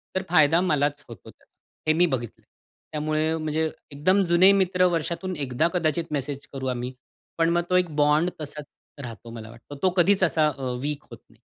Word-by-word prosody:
तर 190 - 0
फायदा 165 0 +5
मलाच 145 -4 0
होतो 115 -7 -12
त्याचा - - -21 0.4
हे - - +3
मी 175 - +5
बघितलंय. 125 -8 -4 0.5
त्यामुळे 155 +1 0
म्हणजे 155 0 -1 0.2
एकदम 185 +8 +2
जुने 185 +3 +7
मित्र 185 -1 +2
वर्षातून 170 +3 -2
एकदा 140 +1 0
कदाचित 165 -2 0
मेसेज 140 -1 -4
करू 135 -1 -4
आम्ही, 125 0 -3 0.5
पण 165 0 +3
मग 170 0 +2
तो 180 - +2
एक 180 -1 +1
बॉन्ड 150 +3 +3
तसाच 150 0 -7 0.4
राहतो 115 -1 -9
मला 110 -1 -9
वाटतं. 120 +5 -12
तो 190 - +5
कधीच 190 +2 +4
असा 160 -3 +3
अ, 130 -2 -3
वीक 145 +1 -3
होत - - -10
नाही. - - -24
155 Hz, 180 wpm, -25 LUFS, 140-175 Hz, 0.5 s, जुने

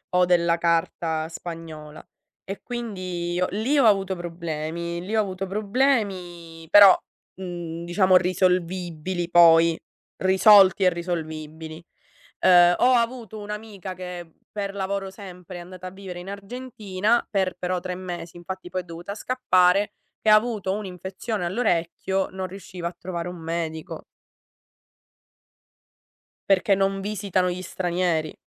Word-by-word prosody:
o 180 0 +5
della 170 -1 +3
carta 165 -1 0
spagnola. 160 -3 -9 0.4
E 195 +1 -6
quindi 185 -7 -4
ho 180 - +2
lì 225 +9 0
ho 275 - +5
avuto 195 -3 +3
problemi 170 0 -4
lì 195 +5 -4
ho 220 - +4
avuto 190 -1 -4
problemi, 195 -7 -1
però, 200 -1 +9 0.4
mhmm, 175 -2 -6
diciamo 185 +1 +4
risolvibili 180 -1 -1
poi 165 -1 +6 0.4
risolti 190 0 +6
e 185 - +6
risolvibili. 160 -2 -5 0.6
Uhm, 175 -1 +6
ho 255 +1 +4
avuto 230 -3 -1
un'amica 210 -2 -7
che, 180 -2 -8 0.2
per 200 -1 -4
lavoro 195 0 -3
sempre, 180 -2 -10
è - - -7
andata 185 +1 -9
a - - -5
vivere 185 -1 -9
in 185 +2 -8
Argentina 210 0 -2
per 190 -3 0
però 180 0 -1
3 180 -1 -4
mesi. 175 -2 -7
Infatti 180 +1 -7
poi 185 +1 -2
è - - -16
dovuta 175 +4 -7
scappare, 205 -5 +2 0.3
che 215 - +2
ha 215 - +9
avuto 215 -4 0
un'infezione 190 +1 -5
all'orecchio, 190 -1 0
non 190 0 -4
riusciva 185 -2 -7
a 175 - -7
trovare 175 -2 -5
un 180 - -6
medico. 160 -1 -5 2.5
Perché 195 +1 +4
non 195 0 0
visitano 195 -2 -1
gli 180 +1 -5
stranieri. 175 -3 -1
185 Hz, 130 wpm, -24 LUFS, 170-200 Hz, 2.5 s, però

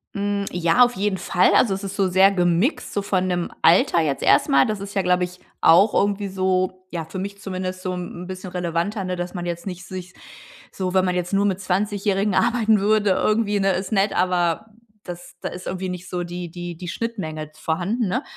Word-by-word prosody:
Hm. 200 0 -1
Ja, 175 +8 +4
auf 245 0 +1
jeden 195 0 0
Fall, 185 0 +2
also, 210 - +4
es 195 +1 -5
ist 195 0 -5
so 195 -2 +2
sehr 190 +2 +5
gemixt, 180 - +1
so 205 - 0
von 185 -2 0
dem 175 -1 -1
Alter 175 -1 +5
jetzt 145 -4 -1
erst - - +4
mal. 135 0 +5
Das 215 -1 -2
ist 200 0 -7
ja, 195 - +1
glaube 180 0 +2
ich, 180 0 -5 0.2
auch 185 +6 +6
irgendwie 200 0 +1
so 185 -1 -1
ja, 165 -2 -4
für 185 +4 -7
mich 200 +1 -5
zumindest 185 -2 -4
so 185 -1 -2
'n 180 0 -6
bisschen 185 0 -7
relevanter, 180 +3 -2
ne, 180 0 -2
dass 175 +1 -5
man 175 -1 -5
jetzt 170 +1 -4
nicht 180 -1 -6
sich 185 -1 -8 0.6
so 185 -1 -3
wenn 185 -1 +4
man 180 -1 0
jetzt 180 +2 -2
nur 200 +1 +3
mit 195 -2 0
Zwanzigjährigen 200 +1 0
arbeiten 220 -3 +3
würde 210 0 +2
irgendwie, 210 +1 +1
ne, 195 0 +2
ist 190 +3 -3
nett, 200 -1 +2
aber 175 +1 +1 0.4
das 175 -1 -9
da - - -3
ist 180 +1 -8
irgendwie 185 0 -3
nicht 180 0 -6
so 180 -1 -2
die 175 0 -6
die 175 -1 -7
die 180 - -8
Schnittmenge 160 -9 -4
vorhanden, 180 +9 -1
ne? 255 +9 -1
185 Hz, 215 wpm, -22 LUFS, 175-200 Hz, 0.6 s, auch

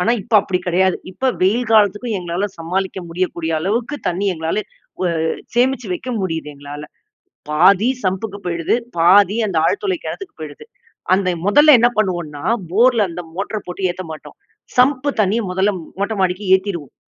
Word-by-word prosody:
ஆனா 230 +6 +2
இப்ப 230 +2 -4
அப்படி 185 -3 -1
கிடையாது. 185 +1 +2 0.2
இப்ப 260 +8 0
வெயில் 220 +5 +2
காலத்துக்கும் 210 +1 +3
எங்களால 175 +2 -3
சமாளிக்க 190 +3 -2
முடியக்கூடிய 170 -1 -2
அளவுக்கு 230 - -1
தண்ணி 185 +3 -2
எங்களால 160 +5 -2 0.4
வ - - +1 0.5
சேமிச்சு 250 -1 +1
வைக்க 255 +7 -6
முடியுது. 160 -5 -3
எங்களால. 145 +1 -9 0.7
பாதி 185 +8 +4 0.2
சம்புக்கு 195 +2 -2
போயிடுது, 170 +2 0 0.2
பாதி 195 +4 +5
அந்த 185 -5 -3
ஆழ்துளை 375 - 0
கிணத்துக்கு 390 - -6
போயிடுது. 150 -2 -9 0.5
அந்த 190 -1 0 0.2
முதல்ல 295 +8 +7
என்ன 240 +1 +5
பண்ணுவோன்னா 175 -8 -1 0.3
போர்ல 230 +2 +4
அந்த 175 +1 -6
மோட்டர 205 +3 -3
போட்டு 185 +1 -2
ஏத்த 185 +1 -5
மாட்டோம். 155 - -9 0.4
சம்பு 270 +2 +3
தண்ணிய 210 +3 +2
முதல்ல 190 +3 +2 0.3
மொட்டை 210 +2 -1
மாடிக்கு 185 +2 0
ஏத்திருவோம். 185 -8 -6
190 Hz, 150 wpm, -19 LUFS, 175-220 Hz, 0.7 s, முதல்ல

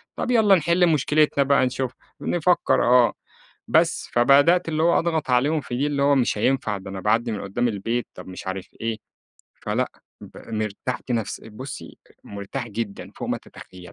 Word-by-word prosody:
طب 250 - -2
يالّا 215 -5 +5
نحل 170 +2 +3
مشكلتنا 150 -1 +2
بقى 140 -1 +3
نشوف 130 0 -2 0.3
نفكّر، 175 +1 +2
آه. 125 -1 +5 0.5
بس، - - +2
فبدأت 145 +8 +4
اللي 155 0 0
هو 170 - +4
أضغط 160 -4 -1
عليهم 145 +5 +2
في 120 -1 -5
دي، 145 +2 +1
اللي 140 -1 -1
هو 140 0 +4
مش 125 -5 +1
هينفع، 110 -3 0
ده 95 0 -9
أنا 95 - -5
باعدّي 115 +2 +1
من 105 - -4
قدّام 100 +5 -1
البيت، 115 +3 -2
طب - - -10
مش 95 0 -9
عارف 95 0 -4
إيه، 115 -1 -2 0.6
فلأ، - - -2 0.3
ب - - -12 0.2
مرتاحت 110 +4 -4
نفس 115 -3 -2
بُصّي، 110 +5 -9 0.3
مرتاح 100 +5 -6
جدًا 105 -1 -5
فوق - - -5
ما - - 0
تتخيلي. 90 -1 -13
125 Hz, 170 wpm, -23 LUFS, 110-150 Hz, 0.6 s, يالّا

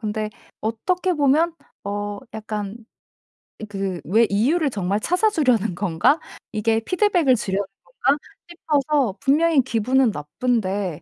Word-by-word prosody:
근데 215 -1 -2 0.3
어떻게 355 - -1
보면 305 +3 +3 0.3
어 205 0 -3 0.2
약간 215 -1 -5 0.9
그 195 -4 -3
왜 220 +7 +4
'이유를 280 +9 +2
정말 200 -1 -1
찾아 360 - +2
주려는 245 - +1
건가? 195 - +2 0.3
이게 220 +1 +1
피드백을 350 - +2
주려는 200 -2 -2 0.2
건가?' 260 +11 0 0.3
싶어서 295 - 0
분명히 305 +1 +3
기분은 255 +1 +2
나쁜데 190 +1 -2
225 Hz, 255 characters per minute, -22 LUFS, 205-295 Hz, 0.9 s, 왜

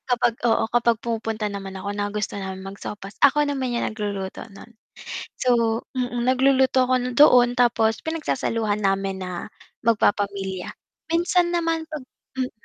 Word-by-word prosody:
Kapag 240 -1 +2
oo, 225 - +3
kapag 235 -1 +3
pumupunta 225 -2 -2
naman 195 -1 -6
ako, 200 +2 -4
nagustuhan 205 -2 -3
mag-sopas, 195 +1 -8
ako 295 +1 +5
naman 265 -4 -2
yan 235 - 0
nagluluto 200 -3 -4
nun, 200 +4 -14 0.6
so 230 -2 +2
mm, 245 -1 -1
nagluluto 260 0 +3
ako 255 - +3 0.2
doon 245 -3 +6
tapos 225 -2 +3
pinagsasaluhan 230 -9 -1
namin 195 -1 0
na 180 - -5 0.5
magpapamilya, 200 -4 0 0.4
minsan 345 +1 +2
naman 330 -2 0
pag 305 -3 -5 0.4
hmm 255 -1 -1
230 Hz, 130 wpm, -23 LUFS, 200-255 Hz, 0.6 s, doon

